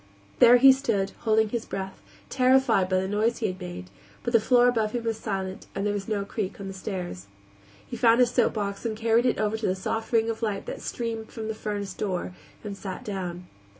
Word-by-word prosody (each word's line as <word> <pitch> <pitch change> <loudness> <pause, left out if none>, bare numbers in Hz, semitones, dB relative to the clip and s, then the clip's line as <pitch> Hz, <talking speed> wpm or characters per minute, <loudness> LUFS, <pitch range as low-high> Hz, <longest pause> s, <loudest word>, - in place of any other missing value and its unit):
There 245 0 +8
he 265 +2 +9
stood, 225 -8 0
holding 220 -1 +2
his 235 0 -2
breath, 190 0 -5 0.3
terrified 255 -7 +3
by 185 - +2
the 190 - -2
noise 215 +4 +1
he 225 - -2
had 185 0 -3
made, 95 - -7 0.3
but 240 - -2
the 230 - +7
floor 245 +2 +4
above 225 -3 +1
him 240 -1 -2
was 225 -1 -1
silent, 190 -3 -4
and 195 +1 -2
there 205 - +1
was 200 -1 -4
no 205 -3 -1
creak 200 -1 -4
on 200 - -6
the 195 - -6
stairs. 180 - -5 0.6
He - - -6
found 235 0 +4
a 250 - +7
soapbox, 215 -5 0
and 225 -2 -2
carried 230 +2 +3
it 245 - +1
over 215 +1 0
to 220 - -2
the 185 - +1
soft 225 +4 -3
ring 225 -1 +3
of 225 - -7
light 210 -3 -2
that - - -6
streamed 225 -2 -4
from 220 -1 -6
the 220 - -2
furnace 205 -2 -4
door, 185 -3 -3 0.3
and 205 -2 -5
sat 195 -1 -7
down. 180 -3 -4
215 Hz, 220 wpm, -26 LUFS, 195-230 Hz, 0.6 s, he